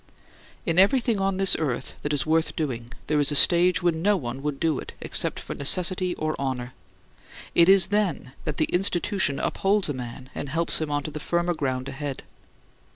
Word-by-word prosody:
In 165 +2 +2
everything 225 +1 +3
on 195 -1 0
this 195 -1 +4
earth 135 -5 -3
that 145 - -3
is 145 -2 0
worth 160 +1 0
doing, 120 -6 -4
there 150 -1 0
is 145 0 +3
a - - -1
stage 175 +3 +5
when 165 -2 +1
no 205 +2 +3
one 130 -3 -6
would 145 -1 -3
do 160 -5 0
it, - - -9
except - - 0
for - - -6
necessity 180 +4 +1
or 155 0 -2
honor. 130 -2 -3 0.8
It 170 +1 +5
is 190 -1 +6
then 180 -11 -1
that 150 - -4
the 155 - +2
Institution 180 -3 +1
upholds 200 -2 0
a - - -1
man 130 +1 -8
and 140 - -5
helps 165 +2 -1
him 155 - -2
on 145 -1 -1
to 155 - -6
the 155 - -6
firmer 170 +3 -1
ground 130 -4 -3
ahead. 140 0 -6
155 Hz, 195 wpm, -25 LUFS, 140-180 Hz, 0.8 s, is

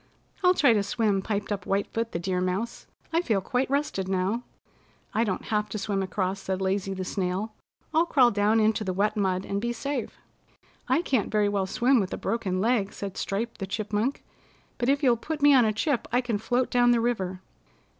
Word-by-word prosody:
"I'll 360 0 +5
try 275 -8 +5
to 210 - +2
swim," 200 -1 0
piped 205 +1 -3
up 195 -3 -3
White 195 +1 +1
Foot 230 0 -2
the - - -2
Deer 180 +1 -1
Mouse. 190 +6 -3 0.3
"I 335 - +3
feel 225 - +1
quite 250 +7 -1
rested 275 -9 -1
now." 190 +5 0 0.7
"I 225 - +2
don't 200 -5 -2
have 210 0 +1
to 215 - -4
swim 200 -1 -1
across," 190 0 -2
said 190 -1 -3
Lazy 195 0 -1
the 185 0 -4
Snail. 190 +3 -2 0.4
"I'll 330 +2 +3
crawl 255 -6 +5
down 210 +2 +2
into 215 0 +2
the 190 -2 -2
wet 205 +3 +1
mud 190 -2 0
and 200 0 -2
be 240 +1 -1
safe." 260 0 -4 0.7
"I 335 - +3
can't 255 - 0
very 210 -1 +2
well 200 -2 0
swim 245 +6 +3
with 195 -2 -2
a - - -7
broken 200 -5 -1
leg," 210 -1 +1
said 195 -2 -6
Stripe 225 +4 -3
the 195 - -4
Chipmunk, 215 +6 -2 0.6
"but 245 0 +1
if 280 +2 +2
you'll 245 -3 +4
put 305 +6 -4
me 290 0 +7
on 255 -3 +6
a 215 - +2
chip 245 +3 -1
I 245 - +3
can 240 -4 -1
float 245 +3 0
down 245 0 +4
the 240 -1 +4
river." 190 -6 -1
215 Hz, 210 wpm, -27 LUFS, 195-240 Hz, 0.7 s, me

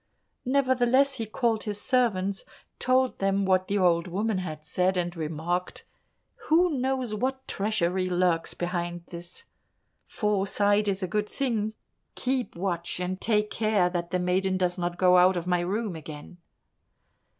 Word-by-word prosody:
Nevertheless 260 0 +3
he 225 - -3
called 225 0 0
his 210 -1 -2
servants, 200 -6 +1 0.4
told 255 0 +2
them 195 0 +1
what 185 -1 +2
the 205 - 0
old 175 -2 +3
woman 200 +3 -1
had 155 -4 -6
said, 185 +4 +1
and 175 0 -1
remarked, 165 +3 -3 0.6
"Who 345 +3 +4
knows 260 -4 -1
what 260 +4 -2
treachery 190 -3 0
lurks 175 -2 +1
behind 175 -1 -3
this? 175 0 -8 0.6
Foresight 205 0 +1
is 195 -1 -1
a - - 0
good 210 +3 -1
thing 225 -6 -1 0.4
keep 255 -1 -2
watch, 175 -1 -3
and 185 +1 -3
take 210 -2 +1
care 215 -5 +1
that 175 -1 -3
the 185 - 0
maiden 185 +1 +1
does 180 -1 0
not 175 -1 -3
go 180 0 +5
out 180 +1 +5
of 170 - -3
my 180 -1 +1
room 195 +2 -2
again." 155 +2 -10
190 Hz, 150 wpm, -27 LUFS, 175-220 Hz, 0.6 s, go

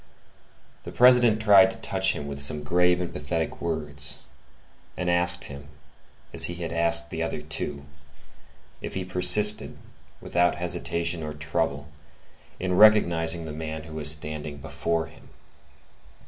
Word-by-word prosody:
The - - -10
President 125 -3 +4
tried 110 +1 +6
to 115 - -7
touch 95 -4 0
him 75 - -7
with 70 0 -6
some 75 +1 0
grave 90 +3 +1
and 90 - -5
pathetic - - -4
words, 75 -3 -3 0.7
and 90 0 -1
asked 90 0 0
him, 70 0 -8 0.7
as - - +1
he 85 - -4
had 85 -1 -6
asked 85 0 +2
the 80 - -5
other 80 -2 -3
two, 75 -1 -5 1.0
if - - -7
he 95 -1 -4
persisted, 105 +4 +4 0.4
without 90 0 0
hesitation 85 -1 -1
or 75 -1 -6
trouble, 75 -1 -3 0.7
in 90 -1 -2
recognizing 85 -6 +4
the 80 - -7
man 80 0 -6
who 80 0 -12
was 75 -1 +1
standing 75 -1 -3
before 80 +3 -3
him. - - -18
85 Hz, 140 wpm, -25 LUFS, 75-90 Hz, 1.0 s, tried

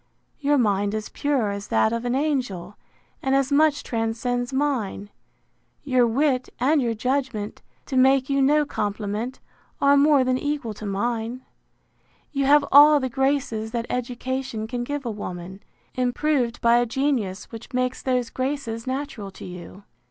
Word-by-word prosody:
Your 290 0 +2
mind 205 -3 +1
is 215 -1 -4
pure 270 -8 0
as 200 0 -6
that 115 - +2
of 230 +1 -3
an 245 +1 0
angel, 250 - -2 0.5
and 270 0 +1
as 275 0 +1
much 295 0 +3
transcends 240 +2 -2
mine. 260 -8 -1 0.7
Your 255 -4 +3
wit, 255 +2 +1
and 285 +4 +3
your 235 -2 0
judgment, 250 -3 -2 0.2
to 270 - -5
make 265 0 +4
you 275 -1 +1
no 295 +2 +4
compliment, 210 +2 -3 0.4
are 280 0 +5
more 285 -1 +5
than 255 0 +1
equal 290 -6 -2
to 210 0 -7
mine: 230 +4 -2 0.9
You 275 -2 0
have 290 +1 +5
all 295 +1 +8
the 260 -1 -2
graces 265 -4 0
that 235 -1 -1
education 250 -1 -3
can 240 +2 -3
give 290 +1 -4
a 235 - -1
woman, 190 -2 -7 0.3
improved 250 -1 0
by 235 0 +5
a 240 0 +2
genius 235 -7 -1
which 225 +4 -10
makes 255 0 -1
those 250 -2 0
graces 255 -3 -3
natural 260 -6 -4
to 195 - -11
you. 180 +2 -10
250 Hz, 155 wpm, -24 LUFS, 220-275 Hz, 0.9 s, all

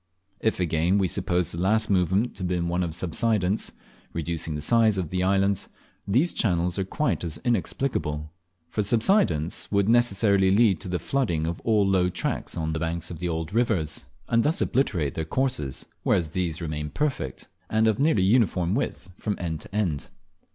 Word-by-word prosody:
If, 110 - 0
again, 85 +2 +2
we 95 -2 +2
suppose 90 0 0
the 85 - -4
last 110 +4 +2
movement 95 +4 +1
to - - -11
have 90 - -2
been 90 -1 -1
one 90 +1 0
of 85 -3 -2
subsidence, 95 +2 0 0.4
reducing 80 -1 -3
the - - -3
size 110 +2 +4
of 90 -5 -3
the 90 0 0
islands, 95 +1 +1 0.4
these 130 - +2
channels 90 -2 +1
are - - +1
quite 150 +6 -1
as 80 -2 -3
inexplicable; 85 - -1 0.3
for 105 - -2
subsidence 105 - +2
would 100 -1 +2
necessarily 100 -4 +4
lead 100 0 +4
to 100 - -7
the 90 0 -1
flooding 85 - -1
of 85 +1 -3
all 105 -3 +3
low 95 -2 +3
tracts - - -3
on 80 -1 -1
the 80 - -2
banks 80 +1 -3
of 85 - -7
the 90 0 -2
old 80 +1 -3
rivers, 110 -10 0 0.2
and 115 -1 +3
thus 150 +6 +1
obliterate 85 - +1
their 80 - -2
courses; 80 - -1 0.2
whereas 80 -4 +1
these 85 -2 -2
remain 75 -1 -3
perfect, 130 - -3 0.2
and 110 0 +3
of 110 +1 +1
nearly 145 -9 +3
uniform 95 -4 +2
width 100 -6 -3
from 105 -2 -2
end 80 -3 -4
to - - -10
end. 85 -8 -1
95 Hz, 180 wpm, -26 LUFS, 85-110 Hz, 0.4 s, size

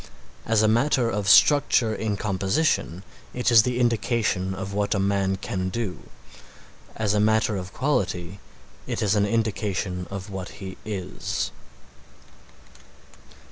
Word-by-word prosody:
As 110 -1 +3
a - - +4
matter 120 +1 +2
of 100 -2 -1
structure 130 -3 +5
in 110 -2 -2
composition 95 - 0 0.3
it 125 0 +1
is 115 -1 +8
the 125 +2 -2
indication 115 -5 0
of 95 +1 -6
what 105 +1 0
a - - 0
man 95 0 +1
can 95 -1 -3
do; 110 -3 -5 0.9
as 105 -2 0
a 105 - +2
matter 110 +1 +2
of 90 -1 -5
quality 100 - -2 0.5
it - - -2
is 105 -1 +2
an 105 -1 +2
indication 100 -5 -2
of 100 +1 -7
what 95 -2 -6
he 95 -1 -7
is. 95 -3 -4
105 Hz, 135 wpm, -24 LUFS, 95-115 Hz, 0.9 s, is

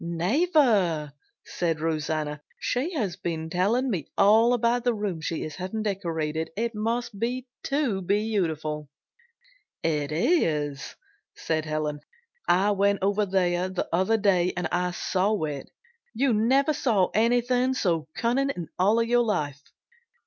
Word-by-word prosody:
"Never!" 185 - +2 0.3
said 165 -3 -2
Rosanna. 155 -2 -2 0.2
"She 300 +9 -1
has 210 - -2
been 160 -1 -4
telling 215 +9 +1
me 170 -9 -3
all 225 +4 +5
about 235 +1 +1
the 245 -2 +1
room 200 -6 -3
she 160 +1 -3
is 155 -1 -7
having 190 +4 -4
decorated. 160 -6 -2
It 230 +1 -1
must 230 0 -2
be 250 +3 -2 0.2
too 275 -9 0
beautiful!" 170 -7 -1 0.9
"It 150 -3 0
is," 150 - 0 0.4
said 155 -1 -2
Helen. 155 -1 -2 0.5
"I 195 +4 +3
went 200 0 +2
over 200 +1 +1
there 180 -1 +1
the 185 - -3
other 190 +6 +3
day 185 -4 +2
and 180 -2 -1 0.3
saw 200 +4 0
it. 145 -3 -4 0.5
You 260 +1 +2
never 265 +8 +3
saw 210 -11 +2
anything 245 +3 +2
so 165 -9 0
cunning 260 +4 +1
in 175 - -5 0.4
your 240 +1 +4
life. 145 - -2
195 Hz, 130 wpm, -26 LUFS, 160-235 Hz, 0.9 s, all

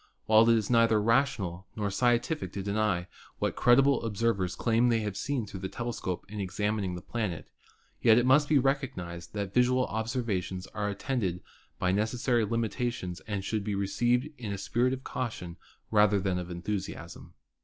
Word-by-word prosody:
While 110 +1 +6
it 115 - +6
is 110 +1 -2
neither 115 -2 +4
rational 105 -6 +1
nor 105 -2 -2
scientific 120 - +1
to 100 - -4
deny 100 -3 0 0.3
what - - -1
credible 135 +3 +4
observ 115 -1 0
ers 90 -1 -2
claim 115 +1 +2
they 115 -1 +2
have 105 -2 -3
seen 130 +2 -2
through 100 -2 -8
the 95 0 -4
telescope 115 -7 -4
in 105 +1 -7
examin 105 +2 -1
ing 90 -2 -3
the 90 - -8
planet, 105 -9 -3 0.5
yet 115 -2 +6
it 120 - +3
must 145 +3 +4
be 155 - +5
recognised 90 -11 -2
that 100 -1 -3
visual 125 +1 +3
obser 115 +4 -1
vations 95 -3 -3
are 105 -1 -1
attended 100 -4 -2 0.4
by 90 - +1
necessary 115 +4 +1
limitations 115 -4 -2
and 100 -3 -3
should 105 0 -1
be 105 -1 -2
received 120 +7 +1
in 110 -4 -4
a 100 - -3
spirit 120 +6 +1
of 130 0 -5
caution 90 -9 -5 0.3
rather 105 -2 +4
than 95 -1 -1
of 90 0 -6
enthusiasm. 95 +3 -5
110 Hz, 175 wpm, -29 LUFS, 95-120 Hz, 0.5 s, While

